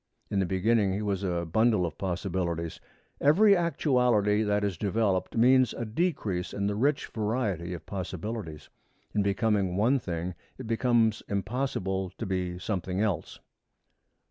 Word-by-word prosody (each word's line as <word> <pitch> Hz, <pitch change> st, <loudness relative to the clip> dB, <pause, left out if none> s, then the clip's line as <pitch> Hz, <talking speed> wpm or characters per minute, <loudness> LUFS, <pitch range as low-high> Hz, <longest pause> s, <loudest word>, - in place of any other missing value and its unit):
In 100 Hz, -, +1 dB
the 95 Hz, -, +1 dB
beginning 100 Hz, +1 st, +2 dB
he 105 Hz, +2 st, -2 dB
was 100 Hz, -2 st, -1 dB
a 85 Hz, -3 st, -1 dB
bundle 110 Hz, +2 st, +2 dB
of 80 Hz, -3 st, -5 dB
possibilities. 90 Hz, -3 st, -2 dB, 0.4 s
Every 200 Hz, +8 st, +6 dB
actuality 125 Hz, -, +2 dB
that 105 Hz, -1 st, +1 dB
is 100 Hz, -3 st, 0 dB
developed 100 Hz, +1 st, 0 dB
means 130 Hz, +2 st, +4 dB
a 120 Hz, -, -3 dB
decrease 110 Hz, -, -1 dB
in 100 Hz, -, -1 dB
the 105 Hz, -, 0 dB
rich 135 Hz, +7 st, +1 dB
variety 105 Hz, -6 st, -2 dB
of 85 Hz, -, -10 dB
possibilities. 95 Hz, -3 st, -5 dB, 0.4 s
In 105 Hz, -, +2 dB
becoming 100 Hz, -2 st, +1 dB
one 125 Hz, +7 st, +3 dB
thing 90 Hz, -3 st, -4 dB, 0.2 s
it 130 Hz, -, -7 dB
becomes 115 Hz, -1 st, +2 dB
impossible 100 Hz, -3 st, -2 dB
to -, -, -4 dB
be 90 Hz, -2 st, -2 dB
something 90 Hz, 0 st, -3 dB
else. 100 Hz, -7 st, -2 dB
100 Hz, 145 wpm, -28 LUFS, 90-115 Hz, 0.4 s, Every